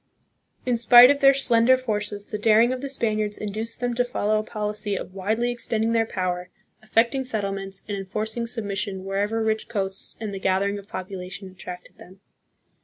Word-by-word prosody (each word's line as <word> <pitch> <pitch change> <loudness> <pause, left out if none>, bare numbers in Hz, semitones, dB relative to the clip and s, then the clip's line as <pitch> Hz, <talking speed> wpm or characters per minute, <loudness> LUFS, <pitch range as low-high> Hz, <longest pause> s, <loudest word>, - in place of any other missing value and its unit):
In 250 -2 +1
spite 240 +2 +9
of 285 - 0
their 275 -1 +6
slender 255 -1 +4
forces, 210 -4 -3
the 210 - -5
daring 225 +3 +4
of 255 - -5
the 275 - -4
Spaniards 215 -5 -1
induced 215 +3 -4
them 245 0 0
to 245 +1 +2
follow 215 -3 0
a - - -3
policy 210 -1 -3
of 185 - -6
widely 220 +5 -1
extending 225 -2 -1
their 225 -1 +2
power, 180 -2 -3 0.3
effect 225 +3 +2
ing 270 -1 -1
settlements, 195 -5 -4
and 205 - -3
enforcing 215 +4 -3
submission 200 -4 -4
wherever 205 +3 -1
rich 220 0 -1
coasts 195 -3 -1
and 215 -2 -5
the 195 - -5
gathering 195 +2 0
of 200 - -14
population 185 0 -7
attracted 180 -1 -10
them. 185 +2 -15
215 Hz, 180 wpm, -24 LUFS, 195-230 Hz, 0.3 s, spite